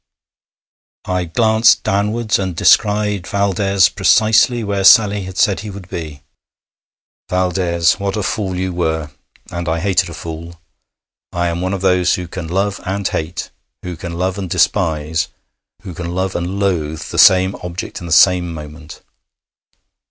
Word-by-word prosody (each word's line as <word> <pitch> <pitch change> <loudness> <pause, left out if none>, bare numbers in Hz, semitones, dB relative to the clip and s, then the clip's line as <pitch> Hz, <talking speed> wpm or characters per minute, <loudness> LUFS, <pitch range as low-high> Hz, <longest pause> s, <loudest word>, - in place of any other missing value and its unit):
I 90 -1 -1
glanced 110 +6 +3
downwards 105 +2 0
and 95 -3 -3
descried 105 0 +2
Valdès 100 -1 +1
precisely 110 +2 +3
where 100 -1 -2
Sally 105 -2 +5
had 95 0 -9
said 100 -5 +2
he 105 - -7
would 95 -2 -10
be. 75 -5 -7 1.1
Valdès, 90 -2 +1
what 100 +1 -2
a 105 - -2
fool 95 -2 -2
you 95 0 -3
were! 80 -3 -2 0.4
And 85 -1 -4
I 80 - 0
hated 95 -1 +1
a 85 - -8
fool. 85 +1 -8 0.7
I 85 0 -1
am 85 +1 -3
one 95 +2 -1
of 95 - -6
those 90 -2 +2
who 90 -1 -6
can 85 -1 -7
love 100 +3 -2
and 95 +1 -2
hate, 80 +1 -4 0.3
who 90 -1 -5
can 85 +1 -7
love 90 +3 -2
and 95 -2 -5
despise, 80 -1 0 0.6
who 95 -3 -8
can 85 +1 -6
love 95 0 -2
and 90 +3 -3
loathe 85 -5 -1
the - - -2
same 95 +1 +6
object 90 0 -6
in 85 - -8
the - - -8
same 90 +1 +4
moment. 75 0 -10
90 Hz, 155 wpm, -17 LUFS, 85-100 Hz, 1.1 s, same